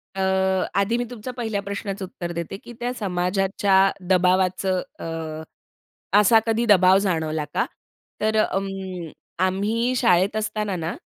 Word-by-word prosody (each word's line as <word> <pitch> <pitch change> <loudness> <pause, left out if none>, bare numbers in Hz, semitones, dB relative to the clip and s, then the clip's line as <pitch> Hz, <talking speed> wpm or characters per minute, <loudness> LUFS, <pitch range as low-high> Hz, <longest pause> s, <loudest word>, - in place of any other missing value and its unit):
अ, 195 - -2 0.6
आधी 210 +4 +1
मी 245 - 0
तुमच्या 245 +1 -7
पहिल्या 225 -4 -2
प्रश्नाचं 200 0 -5
उत्तर 175 -2 -6
देते, 170 +3 -5
की 240 - -10
त्या 245 +1 -2
समाजाच्या 195 +1 +2 0.2
दबावाचं 185 0 +2 0.2
अ, - - -6 1.2
असा 225 +2 +6
कधी 225 +1 +1
दबाव 190 -2 +6
जाणवला 160 -6 -1
का? - - +2 0.6
तर 220 0 +1 0.2
उम्म, 190 -3 -4 0.4
आम्ही 215 +6 0
शाळेत 190 -4 +3
असताना 210 -2 -2
ना, 165 0 -3
195 Hz, 130 wpm, -23 LUFS, 185-215 Hz, 1.2 s, असा